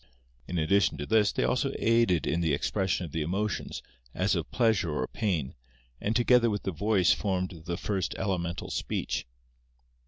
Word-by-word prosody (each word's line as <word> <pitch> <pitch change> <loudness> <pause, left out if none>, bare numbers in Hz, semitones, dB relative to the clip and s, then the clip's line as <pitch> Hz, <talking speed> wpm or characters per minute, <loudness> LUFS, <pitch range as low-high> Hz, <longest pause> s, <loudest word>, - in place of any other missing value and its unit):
In 90 - -3
addition 80 +1 +2
to 75 - -4
this, 105 0 +3
they - - -1
also - - +1
aided 115 -8 +3
in 85 - 0
the 80 -4 +2
expression 90 +3 -1
of 80 - -9
the 80 - -2
emotions, 100 +7 -2 0.3
as - - +1
of - - -2
pleasure 110 -8 +2
or 75 -4 -1
pain, 85 - -2 0.5
and 110 +2 -1
together 120 0 +4
with 105 -2 -2
the 95 - -1
voice 95 +2 +3
formed 90 -4 -3
the 85 -1 -2
first 95 -6 -2
elemental 90 -3 -2
speech. - - -2
95 Hz, 165 wpm, -28 LUFS, 80-105 Hz, 0.5 s, together